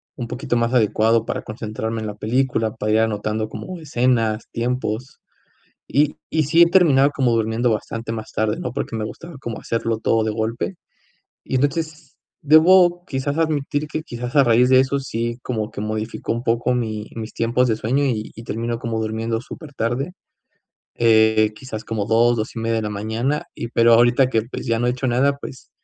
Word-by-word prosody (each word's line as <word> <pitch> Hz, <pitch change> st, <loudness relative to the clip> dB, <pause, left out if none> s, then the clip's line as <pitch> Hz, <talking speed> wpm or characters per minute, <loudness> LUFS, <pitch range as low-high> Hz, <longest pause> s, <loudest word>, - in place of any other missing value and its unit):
un 120 Hz, -3 st, -5 dB
poquito 120 Hz, 0 st, -2 dB
más 115 Hz, +1 st, 0 dB
adecuado 115 Hz, -1 st, +3 dB
para -, -, -3 dB
concentrarme 110 Hz, +1 st, -4 dB
en 110 Hz, -, -4 dB
la 105 Hz, -, -6 dB
película, 115 Hz, 0 st, 0 dB
para 105 Hz, -, -2 dB
ir 110 Hz, -, +4 dB
anotando 110 Hz, 0 st, -1 dB
como 185 Hz, +9 st, -7 dB
escenas, 120 Hz, -6 st, 0 dB
tiempos, 120 Hz, 0 st, -3 dB, 0.7 s
y 150 Hz, +1 st, +2 dB
y 155 Hz, -1 st, +1 dB
sí 165 Hz, +5 st, +5 dB
he -, -, +8 dB
terminado 145 Hz, -7 st, +5 dB
como 130 Hz, -4 st, +1 dB
durmiendo 115 Hz, +2 st, +1 dB
bastante 115 Hz, +1 st, -4 dB
más 110 Hz, -1 st, -6 dB
tarde, 110 Hz, 0 st, 0 dB
¿no?, 125 Hz, -, -4 dB
porque 125 Hz, -, -4 dB
me 110 Hz, -, -2 dB
gustaba 170 Hz, +9 st, -8 dB
como 115 Hz, -4 st, -5 dB
hacerlo 115 Hz, -1 st, -2 dB
todo 115 Hz, 0 st, +1 dB
de 110 Hz, -, 0 dB
golpe, 110 Hz, -, -3 dB, 0.7 s
y -, -, -5 dB
entonces, 155 Hz, +2 st, -1 dB, 0.4 s
debo 175 Hz, +3 st, +6 dB
quizás 140 Hz, +1 st, -2 dB
admitir 150 Hz, -2 st, 0 dB
que 155 Hz, +1 st, -4 dB
quizás 120 Hz, -3 st, -6 dB
a 145 Hz, -, +6 dB
raíz 120 Hz, 0 st, +4 dB
de 130 Hz, 0 st, +6 dB
eso 135 Hz, +1 st, 0 dB
sí 120 Hz, -3 st, -3 dB
como 110 Hz, -3 st, -3 dB
que 110 Hz, -, -7 dB
modifico 110 Hz, +1 st, -3 dB
un 115 Hz, +1 st, -3 dB
poco 120 Hz, +1 st, +1 dB
mi 110 Hz, -3 st, -3 dB
mis 115 Hz, 0 st, -7 dB
tiempos 120 Hz, +2 st, +1 dB
de 110 Hz, -, +1 dB
sueño, 130 Hz, +6 st, 0 dB
y 110 Hz, -6 st, -2 dB
y 115 Hz, -, -9 dB
termino 115 Hz, +1 st, -3 dB
como 115 Hz, -2 st, -3 dB
durmiendo 110 Hz, +1 st, -2 dB
súper 155 Hz, +2 st, -10 dB
tarde, 130 Hz, +8 st, -2 dB, 0.8 s
eh, 110 Hz, -2 st, +4 dB
quizás 115 Hz, -4 st, -7 dB
como 110 Hz, -3 st, -2 dB
2, 120 Hz, +2 st, +3 dB
2 110 Hz, -1 st, -3 dB
y -, -, -2 dB
media 115 Hz, 0 st, 0 dB
de 110 Hz, -, -1 dB
la 105 Hz, -, -2 dB
mañana, 110 Hz, +8 st, -2 dB
y 115 Hz, -, -5 dB
pero 115 Hz, 0 st, +5 dB
ahorita 120 Hz, +3 st, +4 dB
que, 115 Hz, -4 st, +1 dB
pues, 120 Hz, -, -7 dB
ya 115 Hz, -1 st, +1 dB
no 120 Hz, -, 0 dB
he -, -, +3 dB
hecho 125 Hz, +2 st, -3 dB
nada, 135 Hz, +4 st, +2 dB
pues, 130 Hz, -2 st, -10 dB
115 Hz, 195 wpm, -21 LUFS, 110-135 Hz, 0.8 s, he